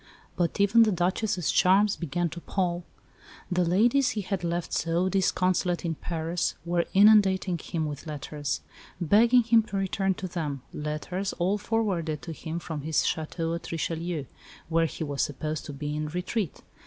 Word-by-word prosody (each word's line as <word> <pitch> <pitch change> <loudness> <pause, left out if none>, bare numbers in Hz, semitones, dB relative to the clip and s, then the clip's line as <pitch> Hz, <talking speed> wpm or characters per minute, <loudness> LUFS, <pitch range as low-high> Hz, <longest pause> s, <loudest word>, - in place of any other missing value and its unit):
But 175 +1 -1
even 205 +3 +5
the 220 -2 +5
Duchess's 180 0 0
charms 195 +3 +4
began 175 +1 -1
to 170 +3 -8
pall; 175 -2 -1 0.7
the 180 0 +2
ladies 230 +10 +3
he - - +1
had 190 -1 -3
left 170 0 -2
so 170 +3 +1
disconsolate 185 -2 +1
in 165 - 0
Paris 165 +1 -2
were 170 0 +1
inundating 195 -3 +5
him 160 0 -3
with 150 0 -6
letters, 150 -1 -4 0.4
begging 230 +8 +5
him 230 0 +5
to 210 -2 -5
return 195 0 0
to 185 - -5
them 150 -7 -4
letters, 155 +6 -3
all 190 +4 0
forwarded 180 - -1
to 165 - -6
him 160 +1 -5
from 160 -3 -5
his 155 +1 +1
château 165 +1 -2
at 170 - -7
Richelieu, 165 -1 -2 0.4
where 165 0 +3
he 160 - -5
was 145 -2 -2
supposed 155 +1 -3
to 145 - -6
be 150 +1 -4
in 150 0 -2
retreat. 180 +3 -3
175 Hz, 165 wpm, -27 LUFS, 160-195 Hz, 0.7 s, even